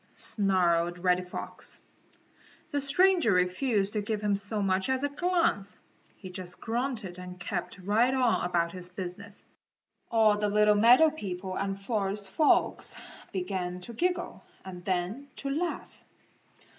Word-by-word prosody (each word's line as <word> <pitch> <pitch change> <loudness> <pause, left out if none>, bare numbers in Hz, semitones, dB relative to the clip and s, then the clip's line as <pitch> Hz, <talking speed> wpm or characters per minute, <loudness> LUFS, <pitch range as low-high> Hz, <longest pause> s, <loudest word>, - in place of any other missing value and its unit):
snarled 175 -4 +1
Reddy 180 0 +2
Fox. 180 0 -8 0.9
The 285 -1 0
stranger 340 - +4
refused 195 +3 +1
to 210 - 0
give 210 +1 -2
him 205 -1 +1
so 200 +1 +1
much 190 +3 +1
as 260 +1 +1
a 285 - +1
glance. 330 - 0 0.4
He 185 -3 -9
just 180 -1 -8
grunted 230 -6 -3
and 180 0 -9
kept 185 -1 -4
right 210 +7 +2
on 255 -3 +2
about 170 -1 0
his 180 0 -8
business. 190 +2 -8 0.6
All 215 -2 +4
the 210 0 +1
little 210 +1 +4
meadow 245 +9 +6
people 190 -9 -5
and 195 0 -2
forest 200 -1 -2
folks 300 +10 +2 0.4
began 180 -1 -3
to 235 - -8
giggle 360 +9 -2 0.2
and 180 -2 -8
then 190 +9 -2
to 275 - -4
laugh. 340 +5 -4
200 Hz, 140 wpm, -29 LUFS, 180-240 Hz, 0.9 s, meadow